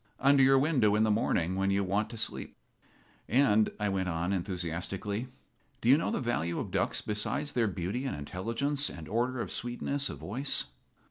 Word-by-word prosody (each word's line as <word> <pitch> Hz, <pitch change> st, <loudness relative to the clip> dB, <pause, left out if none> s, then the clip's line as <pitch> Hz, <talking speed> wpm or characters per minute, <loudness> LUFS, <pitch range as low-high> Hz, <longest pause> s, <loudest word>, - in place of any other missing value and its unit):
under 140 Hz, +1 st, +5 dB
your 135 Hz, 0 st, +6 dB
window 130 Hz, -8 st, +3 dB
in 105 Hz, -, +3 dB
the 110 Hz, -, +3 dB
morning 95 Hz, -4 st, +1 dB
when 95 Hz, +1 st, +1 dB
you 100 Hz, 0 st, +2 dB
want 100 Hz, +3 st, 0 dB
to 115 Hz, -, -8 dB
sleep. 115 Hz, -, -4 dB, 0.7 s
"And," 110 Hz, -4 st, +4 dB
I 105 Hz, -, 0 dB
went 95 Hz, -1 st, -1 dB
on, 85 Hz, +3 st, -1 dB
enthusiastically, 95 Hz, +4 st, -3 dB, 0.5 s
"do 115 Hz, -, 0 dB
you 135 Hz, -, +9 dB
know 155 Hz, -, 0 dB
the -, -, -1 dB
value 85 Hz, -, -1 dB
of -, -, -4 dB
ducks -, -, 0 dB
besides 105 Hz, +8 st, -1 dB
their 120 Hz, -5 st, +1 dB
beauty 100 Hz, +7 st, -3 dB
and 135 Hz, -, -2 dB
intelligence 115 Hz, -, -1 dB
and 80 Hz, -2 st, -9 dB
order 120 Hz, +4 st, 0 dB
and -, -, -3 dB
sweetness 135 Hz, +3 st, -1 dB
of -, -, -6 dB
voice? 135 Hz, +8 st, -1 dB
110 Hz, 185 wpm, -30 LUFS, 95-130 Hz, 0.7 s, you